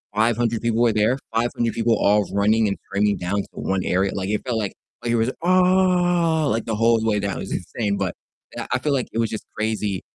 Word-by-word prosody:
500 115 +1 +1
people 115 0 0
were 115 -2 +4
there, 110 +5 +2 0.2
500 115 0 0
people 115 0 +2
all 105 0 +3
running, 105 +2 +3
and 100 - -2
cramming 100 0 +1
down 90 +3 -2
to - - -11
1 95 -1 -2
area, 95 +2 +1
like 95 0 -3
it 105 - 0
felt 120 -3 -1
like 100 -2 -3 0.3
like 120 - -1
it - - +2
was, 115 +3 +1
"Ah!" 180 -3 +3
like, 115 -2 0
the 110 - -2
whole 115 +1 +3
way 105 -2 +1
down, 100 -1 -2
it - - -5
was 95 - -6
insane, 100 +3 -2
but 95 -3 -2 0.4
I - - -5
I - - +2
feel, 150 -2 0
like, 130 - 0
it - - -4
was 115 -2 +1
just 110 - -6
crazy 105 -3 -2
110 Hz, 230 wpm, -22 LUFS, 100-120 Hz, 0.4 s, were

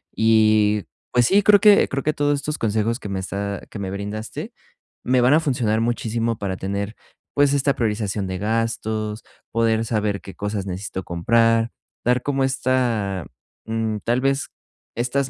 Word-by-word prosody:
y 110 -2 +3 0.3
pues 120 -1 +4
sí, 200 +6 +4
creo 205 0 +7
que 205 0 +6
creo 135 0 -2
que 155 - +1
todos 145 0 +1
estos 150 +2 -3
consejos 110 +2 0
que 105 - -7
me 95 -1 -2
está 100 +1 -4
que 105 - -8
me 95 -1 -4
brindaste, 105 +2 -5 0.5
me 125 0 +3
van 125 +3 +5
a 155 - +6
funcionar 120 -7 0
muchísimo 115 -1 -1
para 95 -2 -3
tener, 100 +3 -3 0.4
pues, 145 -1 +3
esta 140 0 +2
priorización 105 -4 -1
de 95 0 -3
gastos, 110 0 -2 0.3
poder 115 -1 +2
saber 105 -3 -1
qué 95 - -11
cosas 105 -1 -3
necesito 95 0 -5
comprar, 115 +7 +2 0.3
dar 125 +1 +3
como 135 -2 +1
esta, 120 - 0 0.4
mm, 110 -1 -1
tal 120 +2 +1
vez, 135 +1 +1 0.5
estas 130 +3 0
115 Hz, 160 wpm, -22 LUFS, 105-125 Hz, 0.5 s, creo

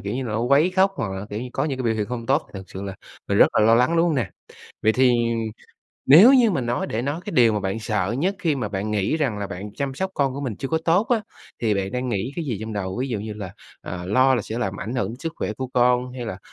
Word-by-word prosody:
kiểu 100 +4 -4
như 130 - -2
là, 110 - -4
nó 110 - -1
quấy 140 +8 +3
khóc, 190 +1 +3
hoặc 95 -4 -3
là, 95 +2 -6
kiểu 105 +2 -4
như, 125 - -5
có 135 - -1
những 135 -4 -2
cái - - -2
biểu 115 - +1
hiện 105 -2 -2
không 115 -2 -5
tốt 135 +4 +2
thật 95 -1 -7
sự 95 - -8
là 95 -1 -5 0.3
mình - - +1
rất - - +8
là - - +4
lo 115 +1 +6
lắng, 125 +8 +3
đúng 170 +1 +4
hông 160 - +1
nè? 115 -8 -1 0.5
Vậy 110 0 +4
thì 125 -1 +4 0.9
nếu 190 - +9
như 240 -5 +5
mà 135 - 0
nói 120 +1 -1
để 110 - -2
nói, 145 +6 -3
cái 210 - -4
điều 115 -3 +5
mà 105 - 0
bạn 95 +3 -2
sợ 105 -1 -1
nhất 190 +7 0
khi 155 -4 +1
mà 115 -6 -3
bạn 100 +1 -3
nghĩ 105 +9 0
rằng 130 -9 -1
là 100 - -4
bạn 100 +3 -7
chăm 140 -2 -3
sóc 190 +7 -3
con 135 -2 0
của 140 - -5
mình 120 -7 -3
chưa 135 - -4
có 160 - +1
tốt 180 +7 +3
á, 230 -3 +2 0.4
thì 110 -2 +2
bạn 100 +1 -2
đang 125 0 -2
nghĩ 115 +4 -2
cái 170 -3 -3
gì 120 -7 -2
trong 110 0 -5
đầu? 95 -1 -3
Ví 135 - -2
dụ 115 -5 -2
như 105 +1 -5
là, 100 -3 -7 0.3
à, 90 0 -6
lo 130 +6 +4
là 115 - 0
sẽ 110 +3 -5
làm 100 -5 -3
ảnh 120 +4 -4
hưởng 115 -1 -2
sức 165 +1 -4
khỏe 105 - -3
của 130 +4 -5
con 125 0 +2
hay 125 -2 -6
là 95 -5 -5
120 Hz, 300 wpm, -23 LUFS, 105-140 Hz, 0.9 s, nếu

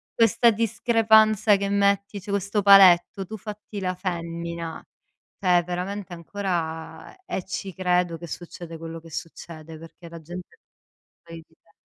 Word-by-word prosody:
questa 230 +1 +4
discrepanza 220 -1 +3
che 200 0 -2
metti, 200 0 +1
cioè, 200 +2 -7
questo 200 +1 0
paletto, 195 -1 +6
"tu 220 +4 -8
fatti 210 0 -8
la 185 -1 -2
femmina". 170 -2 -5 0.6
Cioè 180 -2 +3
veramente 180 +2 -5
ancora 165 -3 -5
e 190 - -4
ci 190 +1 -5
credo 180 -2 0
che 170 +1 -9
succede 170 0 -8
quello 165 0 -7
che 165 0 -15
succede, 160 0 -8
perché 165 +1 -13
la 170 -1 -10
gente 175 +3 -8
è 450 - -41 0.7
fuori 165 -1 -10
di 160 - -30
test 165 - -30
180 Hz, 145 wpm, -24 LUFS, 170-200 Hz, 0.7 s, paletto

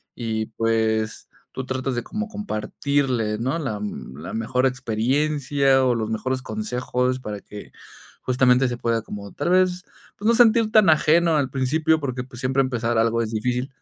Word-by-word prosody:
y 110 -2 -2
pues, 110 -1 -1 0.2
tú 130 - -5
tratas 130 0 -2
de 120 - -2
como 215 +1 -4
compartirle, 130 - -1
¿no?, 130 +7 -1
la 110 -8 -3
la 70 -5 -7
mejor 125 +3 0
experiencia 135 +3 +1
o 125 - +3
los 110 -1 -2
mejores 130 +4 -2
consejos 125 -9 -2
para 105 -4 -6
que 105 - -11 0.5
justamente 130 0 +3
se 120 - -4
pueda 115 -1 0
como 100 -2 -8
tal 145 +4 -2
vez, 180 -1 +2 0.3
pues, 210 - -3
no 235 - +5
sentir 230 -2 +4
tan 215 -4 +5
ajeno 160 +1 +4
al 135 -2 0
principio, 155 +4 +1
porque, 130 -3 -3
pues, 125 -2 -12
siempre 130 +1 +2
empezar 120 -3 -1
algo 115 +1 +2
es 110 - -5
difícil, 125 +4 -2
130 Hz, 165 wpm, -23 LUFS, 115-145 Hz, 0.5 s, no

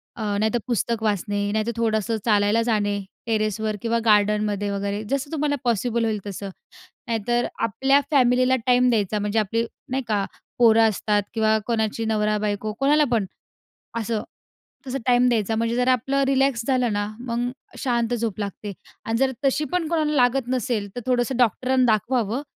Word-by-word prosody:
अ, 225 - -8 0.2
नाहीतर 220 +2 +1
पुस्तक 235 -1 -1
वाचणे, 205 0 -1
नाही 215 0 0
तर 235 - +1
थोडंसं 225 -1 0
चालायला 210 0 +3
जाणे 205 -3 0 0.3
टेरेसवर 215 -1 -1
किंवा 230 0 0
गार्डनमध्ये 210 -1 +2
वगैरे, 200 +1 -3
जसं 275 +1 -2
तुम्हाला 300 -2 0
पॉसिबल 235 0 0
होईल 215 -2 -1
तसं. 200 0 -6 0.6
नाहीतर 240 +1 0 0.2
आपल्या 270 +6 +3
फॅमिलीला 255 -2 +4
टाईम 250 0 +4
द्यायचा, 210 -2 0
म्हणजे 210 +1 -1
आपली 225 +2 0 0.3
नाही 265 +1 -1
का 205 -2 +1 0.3
पोरं 225 -1 +6
असतात 210 0 0
किंवा 220 -1 +3
कोणाची 225 -1 -1
नवरा-बायको, 210 -1 -1
कोणाला 295 +2 +4
पण 220 -4 +2 0.7
असं. 225 -1 -2 0.6
तसं 265 +1 -3
टाईम 250 0 +4
द्यायचा. 225 -2 +1
म्हणजे 230 +1 0
जर 250 +1 +1
आपलं 270 +2 +2
रिलॅक्स 270 -3 +1
झालं 255 -4 +1
ना, 205 0 -1 0.2
मग 240 0 -1 0.3
शांत 240 -2 0
झोप 225 -3 -3
लागते. 205 0 -5 0.3
आणि 225 - -1
जर 265 +1 +2
तशी 275 +3 +2
पण 355 -3 0
कोणाला 310 -3 0
लागत 250 0 +2
नसेल, 240 -5 -1
तर - - -2
थोडंसं 250 0 +1
डॉक्टरांना 255 +2 +2
दाखवावं, 235 +3 0
230 Hz, 155 wpm, -23 LUFS, 210-250 Hz, 0.7 s, पोरं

